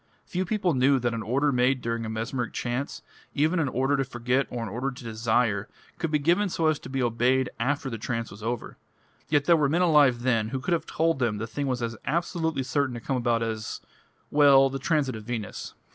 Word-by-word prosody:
Few 185 +1 -2
people 190 -3 0
knew 135 +1 +4
that 120 -2 -1
an 115 - -3
order 135 +7 +1
made 125 +1 +2
during 115 -1 -3
a - - -4
mesmeric 115 +2 -3
trance, 125 +3 -3 0.3
even 155 +5 +2
an 155 - +1
order 135 +3 +1
to 135 - +1
forget 125 +1 -1
or 120 -1 -4
an - - -4
order 125 +7 -2
to 130 -1 -10
desire, 110 -2 0 0.3
could 165 - -1
be 150 - +2
given 175 +7 +2
so 165 -2 -1
as 155 -1 +2
to - - -10
be 135 -1 -1
obeyed 125 +2 +2
after 140 +4 0
the 115 -4 -4
trance 115 0 -3
was 100 - -11
over. 120 +2 -4 0.5
Yet 145 -1 +2
there 170 - +6
were 150 -3 +2
men 170 +5 +2
alive 145 -8 +4
then 115 -4 +1
who 130 +2 -3
could 170 +7 -1
have 170 - -1
told 165 -2 +1
them 115 -5 0
the 110 - -3
thing 140 +5 -3
was 125 -2 -1
as 115 -1 -3
absolutely 160 -2 -1
certain 140 -1 0
to - - -5
come 130 +4 -2
about 120 -1 +1
as 110 -1 -4 0.5
well, 140 -2 +6
the 135 - -3
transit 140 -3 0
of 110 -1 -8
Venus." 115 -4 -5
130 Hz, 225 wpm, -26 LUFS, 115-145 Hz, 0.5 s, there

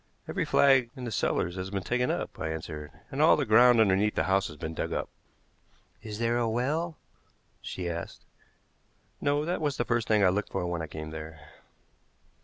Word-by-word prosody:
"Every - - -1
flag 135 -4 +4
in 130 - -8
the 120 - -4
cellars 90 -2 0
has 95 +1 -4
been 95 -1 -3
taken 125 +3 0
up," - - -3
I 80 - -2
answered; 80 -1 -6 0.2
"and - - -1
all - - +6
the - - 0
ground 120 +2 +6
underneath 105 0 +3
the - - +2
house 95 0 +2
has 75 - -10
been 80 +1 -5
dug - - -3
up." - - -2 0.9
"Is 105 -2 -7
there 115 +1 +1
a 115 -1 +1
well?" 155 +8 -1 0.6
she 90 -2 -5
asked. 85 0 -6 1.0
"No; 145 +1 +1
that 175 0 -2
was 145 -3 -1
the 120 - 0
first 120 -1 0
thing 105 -2 +3
I 95 - +6
looked 100 +3 -2
for 95 -2 -2
when 85 -1 -2
I 80 - -4
came 80 +1 -7
there." 80 0 -8
105 Hz, 200 wpm, -28 LUFS, 85-125 Hz, 1.0 s, all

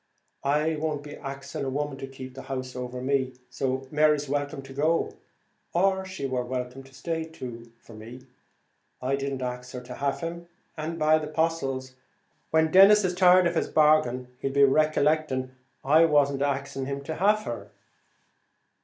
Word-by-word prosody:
"I 150 +3 +1
won't 150 -1 -2
be 145 0 -8
axing 140 -1 -6
a 135 - -1
woman 140 0 -3
to 135 - -5
keep 130 -1 -9
the 135 - -8
house 130 -1 -5
over 125 0 -5
me; 130 -1 0 0.2
so 130 +1 -2
Mary's 150 -1 +3
welcome 145 0 -2
to 135 - -11
go; 155 +4 +1 0.6
or, 190 +2 +2
she 185 -6 -5
wor 130 -2 -1
welcome 125 +1 -4
to 135 - -17
stay, 165 +1 -3
too, 120 -7 -9
for 115 - -16
me. 115 +4 -11 0.7
I 130 +2 0
didn't 135 -1 -3
ax 125 0 -5
her 125 - -5
to 125 0 -9
have 140 +3 -2
him, 170 +1 -5 0.3
and, 160 +1 -4
by 155 0 +4
the 155 - -5
'postles, 150 -5 -1 0.6
when 160 0 +3
Denis 200 +2 +8
is 180 -1 +1
tired 180 0 +6
of 170 - +2
his 165 - 0
bargain, 150 -5 +3
he'll 135 - -2
be 140 +1 +4
recollecting 150 -2 +2 0.3
I 155 +4 +6
wasn't 140 -3 +2
axing 140 -1 -2
him 140 0 -4
to 160 - -4
have 210 +3 +3
her." 120 - -6
140 Hz, 170 wpm, -27 LUFS, 130-155 Hz, 0.7 s, Denis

